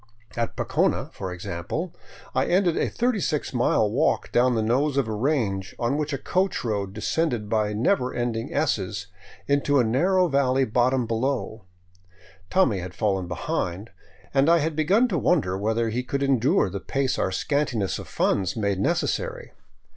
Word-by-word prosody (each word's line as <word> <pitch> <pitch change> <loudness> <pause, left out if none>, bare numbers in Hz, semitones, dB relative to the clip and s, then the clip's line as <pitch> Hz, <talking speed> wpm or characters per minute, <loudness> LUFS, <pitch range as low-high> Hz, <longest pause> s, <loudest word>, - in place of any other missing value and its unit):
At 115 -1 -2
Pocona, - - 0
for 95 -1 -5
example, 90 - -4 0.4
I - - +1
ended 175 -2 +2
a - - 0
36 210 - -1
mile 120 -3 +2
walk 130 +10 0
down 125 0 +3
the 110 - +1
nose 135 +6 +1
of 135 -4 +2
a 110 - -3
range 105 -6 -1
on 120 +4 0
which 150 0 -2
a 140 - -1
coach 185 +7 -1
road 100 -4 -1
descended 115 +1 -1
by 105 -1 0
never 125 - +1
ending 120 0 -2
S's 100 -10 -1 0.6
to 145 0 +2
a - - +4
narrow 180 +11 +2
valley 135 -3 +2
bottom 125 +2 +1
below. 115 -2 -2 0.8
Tommy 130 - +3
had 90 0 -7
fallen 95 -4 0
behind, 90 +4 -3 0.4
and 135 +3 +4
I 170 - +6
had 160 0 -1
begun 195 +11 +3
to 180 - 0
wonder 135 - +2
whether 110 +3 0
he 120 +3 -1
could 140 +2 -2
endure 135 -5 +3
the 100 - -4
pace 135 +5 -1
our - - 0
scantiness 120 -2 -1
of - - -9
funds 95 -3 0
made 100 -3 0
necessary. 485 - -1
125 Hz, 160 wpm, -25 LUFS, 105-150 Hz, 0.8 s, I